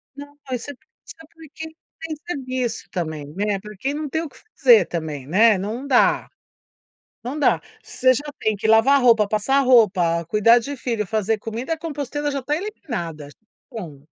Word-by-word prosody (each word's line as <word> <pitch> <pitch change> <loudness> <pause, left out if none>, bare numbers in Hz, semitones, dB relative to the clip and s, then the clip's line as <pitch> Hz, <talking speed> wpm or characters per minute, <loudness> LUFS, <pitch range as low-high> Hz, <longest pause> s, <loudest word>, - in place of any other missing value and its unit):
Não, 285 0 -11 0.2
isso 250 +3 -4 0.3
isso - - -11
é - - -14
porque 320 0 -10 0.3
tem 320 -1 -4
que 295 - -24
serviço 255 -4 -3
também, 155 -5 -4
né, 200 +1 -1
porque 215 +7 -5
não 300 -1 -4
tem 320 +3 -1
o 310 - -7
que - - -20 0.2
fazer 235 -8 +6
também, 155 -5 -5
né, 210 +6 +4
não 225 +8 -5
dá. 255 - +3 1.0
Não 275 +5 -4
dá. - - +3 0.2
Você 255 0 +2
já 285 +5 -4
tem 220 - 0
que 210 +2 -3
lavar 250 +5 +5
roupa, 230 -4 +5
passar 250 +6 +2
roupa, 185 -10 +3
cuidar 215 +6 +4
de 280 +5 -6
filho, 230 -6 -3
fazer 220 +1 0
comida, 230 +8 -5
a - - -5
composteira 290 -2 -3
já 280 -1 -2
está 290 +3 -3
eliminada, 175 - -6 0.4
bom. 155 -10 -8
235 Hz, 175 wpm, -22 LUFS, 205-280 Hz, 1.0 s, fazer